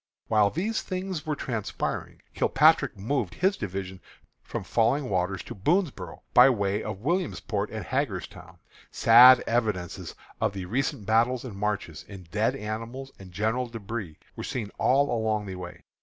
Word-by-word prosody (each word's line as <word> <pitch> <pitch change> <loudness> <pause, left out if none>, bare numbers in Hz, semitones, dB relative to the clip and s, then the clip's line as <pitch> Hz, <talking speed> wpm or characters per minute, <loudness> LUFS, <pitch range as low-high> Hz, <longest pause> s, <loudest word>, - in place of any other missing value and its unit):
While 105 -2 +4
these 205 - -2
things 185 -4 -4
were 150 - 0
transpiring, 115 -7 -4
Kilpatrick 145 -5 +3
moved 110 -2 -2
his 190 +2 +2
division 95 - -5 0.4
from - - -5
Falling 125 +2 +1
Waters 95 0 -1
to - - -8
Boonsboro' 155 - -1
by 125 +2 +8
way 100 -4 0
of 95 - -6
Williamsport 135 - -1
and 110 -1 -6
Hagerstown. 95 - -4 0.3
Sad 125 +2 +8
evidences 105 -7 -2 0.3
of - - +1
the 95 -2 -5
recent 115 0 -2
battles 115 +4 +2
and 115 -6 -7
marches, 100 -6 -3
in 100 -3 -10
dead 110 +5 +1
animals 115 +4 -6
and 95 -2 -12
general 110 +7 -1
débris, 110 -6 -6 0.2
were - - -6
seen 110 -5 -4
all 140 -1 +3
along 110 -2 0
the 95 - -6
way. 90 -1 -9
110 Hz, 150 wpm, -27 LUFS, 100-135 Hz, 0.4 s, by